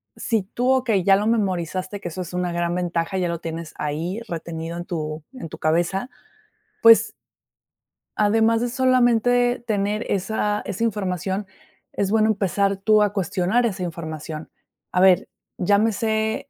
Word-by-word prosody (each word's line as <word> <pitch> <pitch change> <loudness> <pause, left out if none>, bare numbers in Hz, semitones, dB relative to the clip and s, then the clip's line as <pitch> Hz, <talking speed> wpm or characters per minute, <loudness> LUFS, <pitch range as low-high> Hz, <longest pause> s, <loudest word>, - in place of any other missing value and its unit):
si 225 -4 -1
tú 245 +6 -2
okey, 240 -7 +2
ya 195 +2 +6
lo 210 +2 -1
memorizaste, 185 -3 -1
que 195 - -6
eso 185 +3 -6
es 180 -1 -7
una 180 0 -1
gran 170 0 -1
ventaja, 175 +1 -1
ya 180 -1 0
lo 170 -1 -3
tienes 165 -1 -6
ahí, 165 +8 -3
retenido 165 0 -5
en 175 - -5
tu 155 -3 -4
en 255 -11 -8
tu - - -9
cabeza, 175 +8 0 0.7
pues 230 0 +7 1.1
además 225 +2 +3
de 245 - 0
solamente 245 -1 +3
tener 210 0 -1
esa 210 +1 0
esa 205 +3 -3
información. 195 -2 -2 0.5
Es 195 -1 -1
bueno 220 0 +3
empezar 200 -1 +1
tú 215 +2 +3
a 205 - +1
cuestionar 195 +4 +1
esa 195 -5 -2
información. 160 -2 -6 0.4
A 180 - +2
ver, 185 -1 +5 0.3
llámese 220 +2 +1
195 Hz, 150 wpm, -23 LUFS, 175-220 Hz, 1.1 s, pues